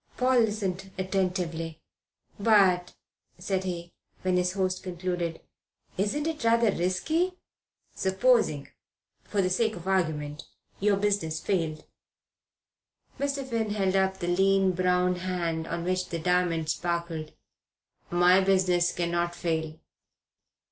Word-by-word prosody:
Paul 255 Hz, 0 st, +3 dB
listened 195 Hz, -4 st, -1 dB
attentively. 180 Hz, -4 st, -2 dB, 0.6 s
"But," 195 Hz, -4 st, +4 dB, 0.4 s
said 190 Hz, +1 st, -2 dB
he, 175 Hz, -2 st, -5 dB, 0.3 s
when 185 Hz, -1 st, +1 dB
his 180 Hz, 0 st, +1 dB
host 185 Hz, -1 st, -1 dB
concluded, 175 Hz, -2 st, -3 dB, 0.5 s
"isn't 210 Hz, +10 st, -1 dB
it 320 Hz, -5 st, -3 dB
rather 230 Hz, -1 st, +4 dB
risky? 315 Hz, -, 0 dB, 0.6 s
Supposing, 190 Hz, -, +2 dB, 0.6 s
for 200 Hz, -2 st, 0 dB
the 185 Hz, -, +1 dB
sake 220 Hz, +4 st, +1 dB
of 175 Hz, +1 st, -9 dB
argument, 155 Hz, -5 st, -1 dB, 0.4 s
your 200 Hz, 0 st, +3 dB
business 200 Hz, -6 st, 0 dB
failed." 165 Hz, -5 st, -2 dB, 1.3 s
Mr. 275 Hz, -1 st, -2 dB
Finn 230 Hz, -3 st, -1 dB
held 195 Hz, -2 st, +1 dB
up 190 Hz, 0 st, +2 dB
the 175 Hz, -, -4 dB
lean, 195 Hz, +1 st, +3 dB
brown 180 Hz, 0 st, +1 dB
hand 175 Hz, -3 st, -2 dB
on 170 Hz, 0 st, -3 dB
which 185 Hz, +1 st, -1 dB
the 170 Hz, -, -3 dB
diamond 170 Hz, -2 st, +1 dB
sparkled. 170 Hz, -3 st, -3 dB, 0.8 s
"My 175 Hz, +2 st, +5 dB
business 185 Hz, -2 st, +3 dB
cannot 175 Hz, 0 st, -1 dB
fail." 160 Hz, -2 st, -2 dB
185 Hz, 115 wpm, -27 LUFS, 170-195 Hz, 1.3 s, My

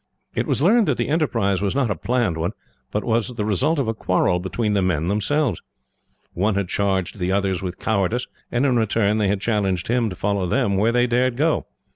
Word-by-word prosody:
It -, -, -1 dB
was 140 Hz, -, 0 dB
learned 220 Hz, +4 st, +4 dB
that 140 Hz, -, +1 dB
the 120 Hz, -, -1 dB
enterprise 115 Hz, -, +1 dB
was 100 Hz, +3 st, -1 dB
not 135 Hz, -6 st, +1 dB
a -, -, 0 dB
planned 120 Hz, -1 st, 0 dB
one, 85 Hz, +5 st, -2 dB, 0.4 s
but 105 Hz, -, -2 dB
was 115 Hz, +1 st, 0 dB
the 105 Hz, -3 st, -2 dB
result 110 Hz, -, +1 dB
of 135 Hz, -5 st, 0 dB
a 110 Hz, -, 0 dB
quarrel 90 Hz, -4 st, +1 dB
between 105 Hz, +4 st, -1 dB
the 100 Hz, -, +2 dB
men, 85 Hz, -3 st, 0 dB
themselves. 110 Hz, -, 0 dB, 0.7 s
One 100 Hz, +4 st, 0 dB
had 100 Hz, -3 st, -1 dB
charged 95 Hz, -1 st, -1 dB
the 90 Hz, +1 st, 0 dB
others 95 Hz, -2 st, 0 dB
with 90 Hz, -1 st, -5 dB
cowardice, 110 Hz, +3 st, 0 dB, 0.3 s
and 120 Hz, +3 st, +1 dB
in 130 Hz, -3 st, +2 dB
return 110 Hz, -1 st, +1 dB
they 105 Hz, -, +2 dB
had 100 Hz, 0 st, 0 dB
challenged 100 Hz, -5 st, 0 dB
him 120 Hz, -2 st, +1 dB
to 90 Hz, -, -6 dB
follow 100 Hz, -1 st, -1 dB
them 100 Hz, 0 st, +1 dB
where 105 Hz, +4 st, +2 dB
they 120 Hz, +1 st, +3 dB
dared 125 Hz, 0 st, +1 dB
go. 155 Hz, +3 st, +1 dB
105 Hz, 215 wpm, -22 LUFS, 95-120 Hz, 0.7 s, learned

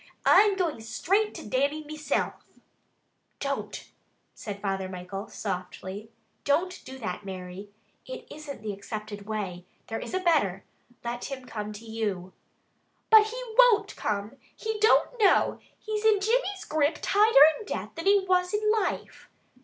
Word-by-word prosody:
"I'm 410 Hz, -1 st, +6 dB
going 335 Hz, -10 st, -1 dB
straight 385 Hz, -, 0 dB
to -, -, -8 dB
Dannie 280 Hz, +7 st, 0 dB
meself." 305 Hz, 0 st, -2 dB, 1.1 s
"Don't!" 280 Hz, 0 st, -4 dB, 0.5 s
said 205 Hz, -3 st, -7 dB
Father 195 Hz, -2 st, -2 dB
Michael 185 Hz, +2 st, -6 dB
softly. 190 Hz, +2 st, -5 dB, 0.3 s
"Don't 350 Hz, +6 st, 0 dB
do 265 Hz, -, -8 dB
that, 220 Hz, -3 st, -5 dB
Mary! 190 Hz, +1 st, -7 dB, 0.4 s
It -, -, -7 dB
isn't 290 Hz, -7 st, -8 dB
the 210 Hz, -1 st, -3 dB
accepted 205 Hz, 0 st, -7 dB
way. 195 Hz, -5 st, -4 dB, 0.3 s
There 225 Hz, -, -3 dB
is -, -, -5 dB
a -, -, +2 dB
better! 290 Hz, -, +2 dB, 0.4 s
Let 240 Hz, 0 st, -4 dB
him 265 Hz, -2 st, -6 dB
come 210 Hz, -3 st, -5 dB
to 215 Hz, +2 st, -10 dB
you." 205 Hz, -5 st, -3 dB, 0.8 s
"But 435 Hz, -1 st, +8 dB
he 480 Hz, +3 st, -6 dB, 0.2 s
won't 430 Hz, -5 st, +5 dB
come! 205 Hz, 0 st, -3 dB, 0.2 s
He 440 Hz, -1 st, -3 dB
don't 445 Hz, +3 st, +4 dB
know! 405 Hz, -3 st, +4 dB, 0.2 s
He's 430 Hz, -1 st, -4 dB
in 435 Hz, -2 st, +5 dB
Jimmy's 405 Hz, -2 st, 0 dB
grip 305 Hz, 0 st, +1 dB
tighter 420 Hz, -5 st, +4 dB, 0.2 s
in 430 Hz, -, -10 dB
death -, -, -4 dB
than 330 Hz, +3 st, -5 dB
he 400 Hz, -1 st, +5 dB
was 360 Hz, +1 st, +2 dB
in 425 Hz, 0 st, +2 dB
life." 435 Hz, -3 st, -2 dB
280 Hz, 145 wpm, -27 LUFS, -, 1.1 s, But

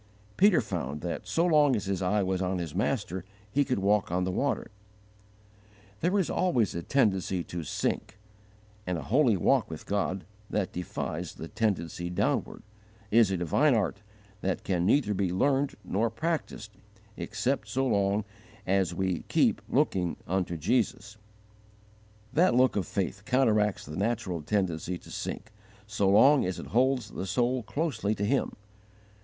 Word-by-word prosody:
Peter 200 Hz, -4 st, +5 dB
found 80 Hz, -, -4 dB
that 85 Hz, -1 st, -4 dB
so 170 Hz, -, +1 dB
long 150 Hz, -6 st, +4 dB
as 105 Hz, -, -2 dB
his 95 Hz, -1 st, -2 dB
eye 100 Hz, +2 st, +1 dB
was 95 Hz, 0 st, -1 dB
on 95 Hz, 0 st, 0 dB
His 85 Hz, -4 st, -4 dB
Master 100 Hz, -4 st, -1 dB, 0.3 s
he 145 Hz, +5 st, +3 dB
could 130 Hz, -2 st, -1 dB
walk 100 Hz, -1 st, +2 dB
on 90 Hz, +1 st, +1 dB
the 95 Hz, -, -1 dB
water. 140 Hz, +4 st, -1 dB, 1.3 s
There 180 Hz, +5 st, +1 dB
is 190 Hz, -, +2 dB
always 125 Hz, -, +1 dB
a 85 Hz, -, -3 dB
tendency 95 Hz, -6 st, +1 dB
to 85 Hz, 0 st, -5 dB
sink, 100 Hz, +6 st, -2 dB, 0.7 s
and 90 Hz, -1 st, 0 dB
a 75 Hz, -, -5 dB
holy 120 Hz, -, +3 dB
walk -, -, +2 dB
with -, -, -8 dB
God, 100 Hz, -2 st, -1 dB, 0.2 s
that 100 Hz, -3 st, -1 dB
defies 90 Hz, -1 st, -4 dB
the 80 Hz, -, -7 dB
tendency 85 Hz, -4 st, -2 dB
downward, 90 Hz, -, -1 dB, 0.5 s
is 115 Hz, -2 st, +5 dB
a 95 Hz, -, 0 dB
divine 120 Hz, -, +3 dB
art 100 Hz, -1 st, -1 dB, 0.4 s
that 95 Hz, -1 st, -2 dB
can 90 Hz, -2 st, 0 dB
neither 110 Hz, -3 st, +3 dB
be 95 Hz, -2 st, 0 dB
learned 135 Hz, +8 st, +1 dB
nor 110 Hz, +4 st, 0 dB
practised 155 Hz, -9 st, -3 dB, 0.4 s
except 115 Hz, +1 st, -2 dB
so 130 Hz, +5 st, 0 dB
long 100 Hz, -3 st, +1 dB, 0.4 s
as 95 Hz, -2 st, +1 dB
we 95 Hz, -1 st, -1 dB
keep -, -, +2 dB
'looking 90 Hz, -3 st, +1 dB
unto 90 Hz, -2 st, -1 dB
Jesus': 110 Hz, -, -1 dB, 1.2 s
that 175 Hz, -2 st, +4 dB
look 130 Hz, 0 st, +4 dB
of 95 Hz, -6 st, -1 dB
faith -, -, -3 dB
counteracts 110 Hz, -6 st, +2 dB
the 75 Hz, -, -7 dB
natural 100 Hz, -5 st, -1 dB
tendency 90 Hz, 0 st, -1 dB
to -, -, -15 dB
sink, 115 Hz, -, -5 dB, 0.3 s
so 100 Hz, -2 st, 0 dB
long 130 Hz, +8 st, +6 dB
as 90 Hz, 0 st, -2 dB
it -, -, -7 dB
holds 125 Hz, -2 st, +2 dB
the 95 Hz, -, -5 dB
soul 125 Hz, +6 st, +1 dB
closely 115 Hz, -5 st, -1 dB
to 100 Hz, -, -1 dB
Him. 135 Hz, +5 st, 0 dB
105 Hz, 155 wpm, -28 LUFS, 90-125 Hz, 1.3 s, long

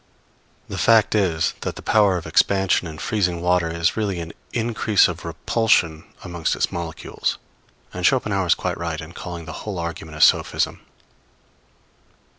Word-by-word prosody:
The -, -, -5 dB
fact 115 Hz, -2 st, +4 dB
is, 90 Hz, -7 st, +1 dB
that -, -, -3 dB
the -, -, -10 dB
power 100 Hz, -4 st, +3 dB
of 85 Hz, -, -6 dB
expansion 95 Hz, -2 st, +2 dB
in 80 Hz, -1 st, -8 dB
freezing 90 Hz, -3 st, -1 dB
water 90 Hz, -1 st, +1 dB
is 85 Hz, +1 st, 0 dB
really 100 Hz, -5 st, -1 dB
an 85 Hz, 0 st, -7 dB, 0.2 s
increase 110 Hz, -3 st, +2 dB
of -, -, -6 dB
repulsion 85 Hz, -9 st, +1 dB, 0.2 s
amongst 85 Hz, -3 st, -2 dB
its -, -, 0 dB
molecules; 85 Hz, -2 st, -3 dB, 0.6 s
and 90 Hz, -, -5 dB
Schopenhauer 100 Hz, -5 st, +2 dB
is 85 Hz, -, +5 dB
quite -, -, -3 dB
right 85 Hz, -2 st, -3 dB
in 80 Hz, +1 st, -8 dB
calling 85 Hz, -2 st, -7 dB
the 80 Hz, -, -7 dB
whole 105 Hz, -3 st, -5 dB
argument 85 Hz, -2 st, -5 dB
a -, -, -4 dB
sophism. -, -, +3 dB
90 Hz, 155 wpm, -22 LUFS, 85-100 Hz, 0.6 s, is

